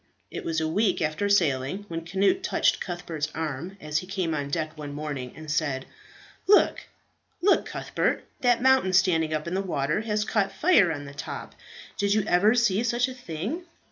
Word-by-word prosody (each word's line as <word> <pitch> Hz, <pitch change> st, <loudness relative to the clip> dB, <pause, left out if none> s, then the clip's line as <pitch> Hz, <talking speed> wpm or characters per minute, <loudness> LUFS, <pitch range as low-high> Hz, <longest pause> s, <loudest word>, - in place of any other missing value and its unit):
It -, -, -5 dB
was 160 Hz, -1 st, -1 dB
a 160 Hz, -, 0 dB
week 195 Hz, +4 st, +1 dB
after 160 Hz, +6 st, -1 dB
sailing, 165 Hz, 0 st, +1 dB
when 165 Hz, -2 st, -5 dB
Cnut 195 Hz, -, +2 dB
touched 375 Hz, -, +1 dB
Cuthbert's 170 Hz, -4 st, -4 dB
arm 160 Hz, +4 st, -4 dB
as 150 Hz, -1 st, -1 dB
he 185 Hz, -, -9 dB
came 185 Hz, -4 st, -2 dB
on 145 Hz, -2 st, -2 dB
deck 155 Hz, +1 st, -2 dB
one 145 Hz, -2 st, -7 dB
morning, 145 Hz, -4 st, -5 dB
and 155 Hz, -1 st, -7 dB
said, 145 Hz, -4 st, -1 dB, 0.6 s
"Look, 410 Hz, +1 st, +4 dB, 0.5 s
look, 390 Hz, +3 st, +3 dB
Cuthbert! -, -, -1 dB, 0.2 s
that 245 Hz, -1 st, +2 dB
mountain 265 Hz, -8 st, +4 dB
standing 170 Hz, -4 st, +3 dB
up 155 Hz, +1 st, -2 dB
in 170 Hz, -, -3 dB
the 190 Hz, -, +1 dB
water 155 Hz, -1 st, -1 dB
has 210 Hz, -1 st, -1 dB
caught 200 Hz, -3 st, +1 dB
fire 295 Hz, -, +4 dB
on 145 Hz, -2 st, -5 dB
the 140 Hz, -, -9 dB
top. 140 Hz, -, -7 dB, 0.5 s
Did 200 Hz, 0 st, +2 dB
you 215 Hz, -, +2 dB
ever 205 Hz, +4 st, +4 dB
see 230 Hz, -4 st, +3 dB
such 240 Hz, +1 st, +1 dB
a 260 Hz, -, -6 dB
thing?" 245 Hz, -, -5 dB
175 Hz, 185 wpm, -26 LUFS, 155-210 Hz, 0.6 s, Look